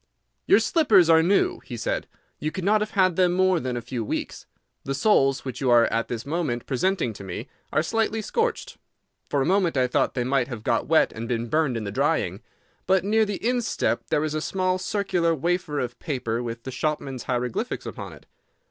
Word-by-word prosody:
"Your - - +7
slippers 205 - +4
are 160 0 +6
new," 190 +4 +2
he 120 - -8
said. 115 - -2 0.3
"You 155 - -1
could 190 - -5
not 210 +3 +3
have 210 - -1
had 185 -3 +3
them 180 -1 +3
more 185 -1 +3
than 125 -4 -3
a 120 - -5
few 120 -1 -4
weeks. - - -4 0.4
The 135 - -3
soles 135 -7 +2
which 130 0 -5
you 130 - +1
are 120 -1 +6
at 115 0 0
this 115 -2 -5
moment 145 -6 -2
presenting 140 - 0
to 100 - -10
me 95 -2 -6 0.2
are 155 - +2
slightly 225 +3 0
scorched. 455 - -2 0.5
For 140 -2 +1
a - - -1
moment 185 -4 +2
I 130 - +3
thought 125 - 0
they 125 - 0
might 130 -1 +1
have 120 -5 -7
got - - 0
wet - - +4
and 115 +1 -6
been 115 -1 -2
burned 150 -3 +1
in 110 - -4
the 100 - -4
drying. - - 0 0.5
But 190 -1 +3
near 220 +2 +3
the 205 +2 -3
instep 245 -2 0
there 150 - +1
is 155 -1 -2
a 155 - -1
small 185 +2 0
circular 180 -4 0
wafer 170 -1 -1
of 120 -1 -4
paper 120 -7 -2
with 115 -1 -6
the 130 - -6
shopman's 135 -1 -3
hieroglyphics 125 - -2
upon - - -7
it. - - -16
155 Hz, 210 wpm, -25 LUFS, 125-185 Hz, 0.5 s, Your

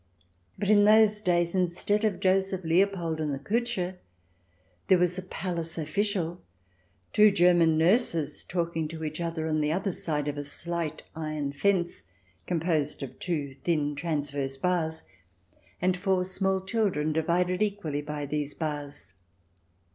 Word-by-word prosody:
But 200 - -2
in 205 -1 +6
those 215 0 +5
days, 175 -3 +2
instead 185 +3 +1
of 210 -5 +1
Joseph 190 0 +1
Leopold 170 -1 +1
and 150 -1 -1
the 140 - -2
Kutscher, 190 - -2 0.9
there 185 - +6
was 180 +1 +1
a - - -4
palace 170 -2 -3
official, 180 +3 0
and 175 - -14 0.7
two 210 0 +7
German 175 -4 +4
nurses 165 - +2
talking 170 -3 -2
to 160 0 -7
each 155 +2 -4
other 165 -1 -2
on 155 -1 +1
the 150 0 +1
other 190 +4 0
side 150 -4 -2
of 145 0 -2
a - - -3
slight 160 +2 -4
iron 155 -3 -3
fence 175 - 0 0.4
composed 160 -4 0
of 135 - -8
two 150 -6 -2
thin 145 +1 -1
transverse 145 -3 -2
bars, 160 -1 0 0.8
and 180 0 +2
four 185 -1 +1
small 190 0 0
children 190 -7 0
divided 180 +4 +1
equally 195 -9 -1
by 150 0 -4
these 145 0 -3
bars. 145 - -5
170 Hz, 145 wpm, -28 LUFS, 150-185 Hz, 0.9 s, two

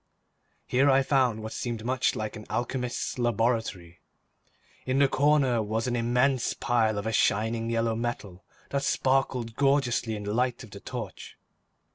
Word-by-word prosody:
Here 135 +3 +3
I 135 0 +4
found 130 -5 +1
what 110 - -5
seemed 115 -2 -4
much 130 +1 +1
like 110 -1 -4
an 105 - -10
alchemist's 125 0 -3
laboratory. 115 -7 -1 0.8
In 130 +1 -1
one 140 0 +5
corner 135 -4 +3
was 110 +2 -2
an 125 -1 -1
immense 125 +2 +1
pile 110 -3 +1
of 100 - -3
a 110 - -1
shining 115 +3 +1
yellow 115 -1 0
metal 110 -5 -4 0.3
that 140 - 0
sparkled 130 -4 0
gorgeously 135 -5 +1
in 105 - -6
the 105 +1 -3
light 125 +1 0
of 115 - -13
the 100 - -9
torch. - - -7
120 Hz, 155 wpm, -27 LUFS, 110-130 Hz, 0.8 s, one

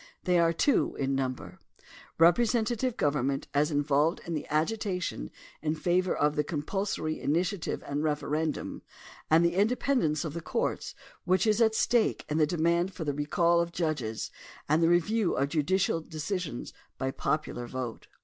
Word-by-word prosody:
They 180 -1 +3
are 165 0 +4
two 240 - +2
in 135 0 -1
niunber 130 -2 -3 0.3
— - - -20
representative 230 +7 +3
government 140 -1 0
as 145 +2 +2
involved 145 +2 +2
in 170 - -4
the 155 - -3
agitation 180 - -1 0.3
in 155 +1 0
favor 180 +3 +1
of 150 0 +1
the 150 - +1
compulsory 155 +2 -2
initiative 175 +4 -1
and 145 +2 -2
referendum, 150 0 -2 0.5
and 165 +2 +5
the 170 - +2
independence 205 - +1
of 155 - -4
the 170 - -5
courts - - -2 0.3
which 185 +4 +2
is 215 +1 +2
at 220 -1 +4
stake 235 -1 +2
in 150 +1 0
the 155 - +4
demand 170 +3 +1
for 170 - -4
the 145 -2 -1
recall 170 +4 +2
of 170 0 -3
judges 150 -11 -2 0.4
and 155 +3 +3
the 165 - +4
review 180 +4 +2
of 140 +1 0
judicial 165 +3 +1
decisions 160 -2 -4 0.2
by 130 0 -1
popular 135 -4 -2
vote. 125 -2 -5
165 Hz, 160 wpm, -29 LUFS, 150-185 Hz, 0.5 s, and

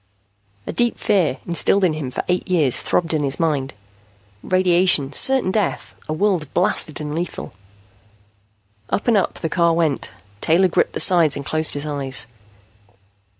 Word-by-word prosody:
A - - -5
deep 240 -1 +1
fear, 175 -11 +1
instilled 175 +3 +1
in 175 -4 +2
him 150 -4 -5
for 125 - -4
eight 180 0 -1
years, 155 -9 +2
throbbed 165 -2 -1
in 155 - 0
his 140 -1 -2
mind. 145 -8 -1 0.7
Radiation, 180 -6 +2
certain 265 - +2
death, 205 -2 -2 0.2
a - - -1
world 175 -4 -1
blasted 155 - +1
and 150 -1 -5
lethal 170 - -5 1.4
Up 205 - -2
and 235 - +4
up 195 - 0
the 165 - -4
car 170 0 +1
went. 160 -4 -1 0.3
Taylor 180 +4 +3
gripped - - 0
the - - -4
sides 170 -6 +4
and 140 - -6
closed 155 +1 +2
his 145 +1 -5
eyes. 140 -5 -1
165 Hz, 155 wpm, -20 LUFS, 150-185 Hz, 1.4 s, and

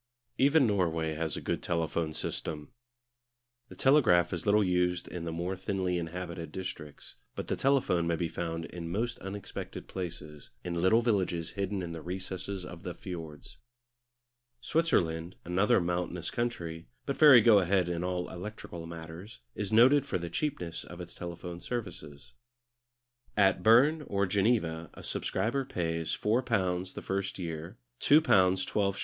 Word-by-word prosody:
Even 140 +1 +5
Norway 80 -7 +1
has 80 -1 -2
a - - -5
good - - -2
telephone 85 -1 -1
system. 75 -1 -4 1.0
The - - -11
telegraph 115 - +4
is 85 +3 -4
little 105 +1 +5
used 90 -1 +1
in 85 -2 -6
the 85 - -3
more 85 +3 -2
thinly 95 -1 -1
inhabited 85 -1 -5
districts, 75 -5 -7 0.2
but - - -5
the - - +1
telephone 130 -11 +2
may 85 - +2
be 85 0 -1
found 80 0 -4
in 85 -1 -7
most 115 +5 -2
unexpected 95 +1 -7
places, 80 -5 -7
in 90 - -3
little 95 +7 +3
villages 95 -7 0
hidden 100 -1 -2
in 85 - -5
the 85 -1 -6
recesses 95 +1 -5
of 90 -2 -9
the 90 -1 -6
fiords. 80 -5 -8 1.0
Switzerland, 90 - 0
another 95 +7 +3
mountainous 90 0 -2
country, 85 - -3 0.2
but 140 - -1
very 145 -5 +9
go 110 -2 +7
ahead 95 -1 +2
in 85 0 -2
all 90 -1 -2
electrical 90 -3 -7
matters, 85 - -9
is 105 -1 -4
noted 125 +6 +6
for 130 - 0
the 85 -1 -6
cheapness 85 - -3
of 85 - -11
its 90 -1 -8
telephone 85 0 -7
services. 80 - -6 1.0
At 95 -3 +4
Berne 130 - +5
or 100 0 +1
Geneva 95 -5 +1
a - - -11
subscriber 135 +5 -1
pays 85 -9 -2
£4 95 -6 0
the - - -6
first 95 0 -2
year, 85 -2 -6 0.2
£2, 150 - +6
12s. 95 -5 +2
90 Hz, 150 wpm, -30 LUFS, 85-105 Hz, 1.0 s, very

